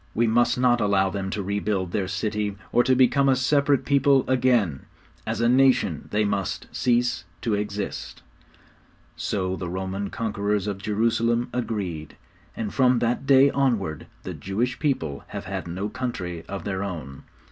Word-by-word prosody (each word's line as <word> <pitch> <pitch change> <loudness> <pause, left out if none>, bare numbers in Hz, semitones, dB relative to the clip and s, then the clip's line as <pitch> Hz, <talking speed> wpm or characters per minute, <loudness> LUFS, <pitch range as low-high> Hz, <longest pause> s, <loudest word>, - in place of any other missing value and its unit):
We 115 - +3
must 120 +2 +3
not 125 -1 +3
allow 95 -2 +2
them 95 -1 -3
to 100 0 -3
rebuild 100 -2 -1
their 95 -1 -1
city, 105 +1 -2
or 120 - +4
to 130 - +3
become 135 +2 +4
a 130 - +5
separate 140 0 +2
people 140 -1 +3
again. 120 - +1 0.4
As 110 +1 -1
a 115 - +3
nation 125 - +3
they 105 0 +2
must 100 -2 -2
cease 120 0 +1 0.2
to 115 - -1
exist.' 105 -1 -4 0.9
So 95 -2 -2
the 90 -2 -5
Roman 95 +2 -3
conquerors 105 -2 -1
of 100 -2 -3
Jerusalem 115 +3 +1
agreed; 95 - -3 0.4
and 110 -3 -3
from 130 -2 +4
that 120 +3 -1
day 135 0 +6
onward 110 - 0 0.2
the - - -5
Jewish 115 +6 -2
people 135 - -1
have - - -7
had - - -4
no 95 +4 -3
country 105 -8 -4
of 100 0 -5
their 100 -1 -2
own. 75 -9 -6
105 Hz, 160 wpm, -25 LUFS, 95-125 Hz, 0.9 s, day